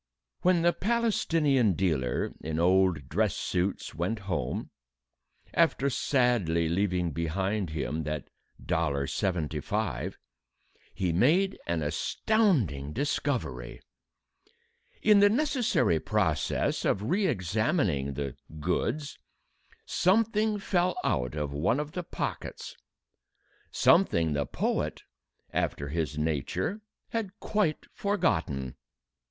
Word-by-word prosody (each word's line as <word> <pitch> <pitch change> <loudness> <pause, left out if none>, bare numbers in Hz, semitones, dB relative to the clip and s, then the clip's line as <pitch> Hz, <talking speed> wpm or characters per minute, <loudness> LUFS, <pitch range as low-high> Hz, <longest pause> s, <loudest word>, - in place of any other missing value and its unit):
When 180 -2 +3
the 175 0 +4
Palestinian 165 - +2
dealer 75 -9 0
in 80 0 -3
old 90 -4 +3
dress - - +1
suits 90 +2 -2
went 90 +7 -1
home 95 -3 -2 0.8
after 140 +2 +3
sadly 120 - +2
leaving 90 -1 0
behind 95 +5 -1
him 75 0 -2
that 75 -1 -3 0.4
dollar 70 -4 0
seventy 80 -1 -1
five - - -2 0.8
he 90 -3 0
made 165 - +3
an 85 -2 0
astonishing 90 - +1
discovery. 115 - -2 1.2
In 210 -1 +6
the 205 0 +7
necessary 245 - +2
process - - 0
of 100 - +1
re 190 - +1
examining 95 - 0
the 70 -2 -3 0.2
"goods," 140 - -2 0.7
something 215 +2 +2
fell 180 -2 +1
out 65 +2 0
of 75 -2 -3
one 90 - +1
of 150 0 -4
the 180 +2 -3
pockets, 170 - -5 0.9
something 80 -2 +3
the 70 -2 -1
poet, - - -2 0.5
after 70 0 -1
his 75 -1 -2
nature, 80 - -1 0.3
had 215 -3 -3
quite 205 -8 0
forgotten. 80 - 0
95 Hz, 100 wpm, -29 LUFS, -, 1.2 s, the